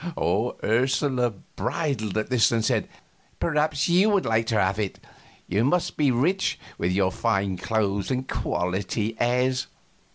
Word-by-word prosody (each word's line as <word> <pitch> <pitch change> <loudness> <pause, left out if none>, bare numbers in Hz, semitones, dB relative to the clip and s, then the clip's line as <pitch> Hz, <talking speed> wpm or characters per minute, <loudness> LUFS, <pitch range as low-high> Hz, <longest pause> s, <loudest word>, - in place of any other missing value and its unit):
Ursula 125 +2 +2 0.3
bridled 125 - -2
at 110 +3 -2
this 125 -3 +4
and 115 -2 +1
said: - - 0 0.5
"Perhaps 150 -2 +1
you 180 +5 +4
would 200 -3 +2
like 115 0 +1
to 110 -2 +1
have 95 +1 +1
it. 100 -3 -3 0.5
You 100 +5 +1
must 175 +7 +1
be 145 -2 +2
rich, 160 +11 +1 0.2
with 90 - 0
your 95 0 +2
fine 95 0 0
clothes 100 0 -1
and 130 0 -2
quality 95 +5 -2
airs." 125 +2 +1
120 Hz, 140 wpm, -25 LUFS, 100-140 Hz, 0.5 s, this